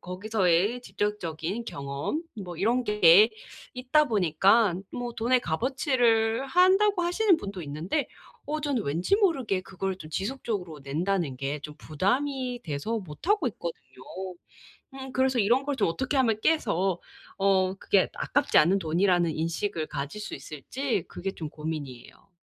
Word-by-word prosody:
거기서의 195 +3 +1
직접적인 205 -1 -3
경험 140 - -4 0.2
뭐 175 -2 -8
이런 235 +7 +1
게 210 0 +6 0.4
있다 265 +4 +2
보니까 195 +1 +3 0.2
뭐 245 -1 -4
돈의 240 +3 +2
값어치를 235 - +1
한다고 375 +5 +4
하시는 360 +2 +3
분도 195 - -6
있는데 160 - -2 0.4
어 305 +1 -2
저는 280 -6 -1
왠지 165 - +1
모르게 270 - +1
그걸 190 0 -4
좀 155 -4 -11
지속적으로 195 - -4
낸다는 160 +1 -1
게 140 +3 -3
좀 150 +1 -9
부담이 250 - -1
돼서 160 +10 -2
못하고 265 - -1
있거든요. 170 -5 -6 1.2
음 265 -1 -8
그래서 260 -2 +2
이런 240 +7 +3
걸 285 0 -1
좀 210 - +2
어떻게 260 - -2
하면 230 -5 +2
깨서 195 - +1 0.4
어 190 -1 +2
그게 195 0 +2
아깝지 - - 0
않은 175 +6 +4
돈이라는 175 0 +2
인식을 165 +1 -2
가질 145 +8 -5
수 - - -6
있을지 175 - -3
그게 195 +1 -5
좀 160 -4 -6
고민이에요. 150 -3 -7
200 Hz, 305 characters per minute, -27 LUFS, 165-255 Hz, 1.2 s, 게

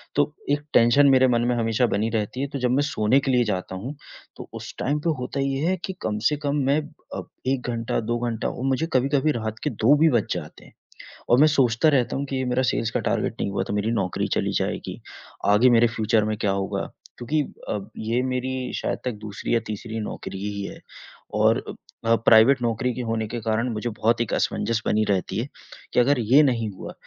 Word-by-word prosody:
तो 145 +1 +2 0.2
एक 145 0 +1
टेंशन 120 +5 +6
मेरे 130 -1 +5
मन 120 -1 +2
में 125 - +1
हमेशा 115 +1 +1
बनी 110 +2 0
रहती 110 +3 -2
है, 140 - -1
तो 140 -1 -5
जब 125 0 +1
मैं 140 +3 +3
सोने 130 -2 +2
के 135 -1 -1
लिए 125 -1 +4
जाता 95 -2 -3
हूँ, 125 +10 -6 0.4
तो - - -10
उस - - -7
टाइम 145 +3 0
पे 165 - -1
होता 125 +2 -4
ये 135 0 0
है 185 - +2
कि 190 - -5
कम 105 -1 -2
से 150 - 0
कम 140 - +1
मैं 140 +3 +3 0.4
अ, - - -3 0.3
1 130 -2 -1
घंटा 115 0 -1
2 120 +2 -1
घंटा 115 -1 -2
और 125 - -6
मुझे 135 +5 0
कभी-कभी 140 +3 +2
रात 110 -3 -4
के 150 - +1
2 120 +2 +3
भी 160 +2 +5
बज 120 -5 +2
जाते - - -8
हैं। - - -18 0.6
और 120 - +5
मैं 150 - +7
सोचता 135 -1 +3
रहता 130 -5 +1
हूँ 140 - -2
कि 135 -1 -4
ये 130 - -1
मेरा 125 +1 +1
सेल्स 115 -2 0
का - - 0
टारगेट - - -1
नहीं 100 - -1
हुआ 95 -1 -1
तो - - -3
मेरी 105 +2 0
नौकरी 100 -6 -1
चली - - 0
जाएगी, - - -4 0.5
आगे 105 +5 +5
मेरे 120 0 +5
फ़्यूचर 110 -1 +1
में 110 0 -1
क्या 100 -2 0
होगा? 95 0 -2 0.4
क्योंकि 145 +6 0 0.3
अ, 105 - -1 0.2
ये 115 +3 0
मेरी 130 0 -2
शायद - - -2
तक 125 - -1
दूसरी 100 +1 -4
या 115 - +3
तीसरी 110 +1 -5
नौकरी 95 -2 -6
ही 100 -1 -4
है - - -8 0.6
और - - +3
अ - - -5 0.4
अ, 115 - +7
प्राइवेट 115 +4 +5
नौकरी 120 +2 0
के 125 - -3
होने 110 -1 -1
के 120 +2 -4
कारण 115 +3 0
मुझे 110 +3 -3
बहुत 115 +1 +3
एक 115 - -2
असमंजस 115 -1 0
बनी 110 0 +2
रहती 95 +2 0
है 120 - -2 0.5
कि - - +3
अगर 135 +2 +3
ये 130 +7 +5
नहीं 115 -5 +1
हुआ 95 - -9
120 Hz, 225 wpm, -24 LUFS, 110-135 Hz, 0.6 s, मैं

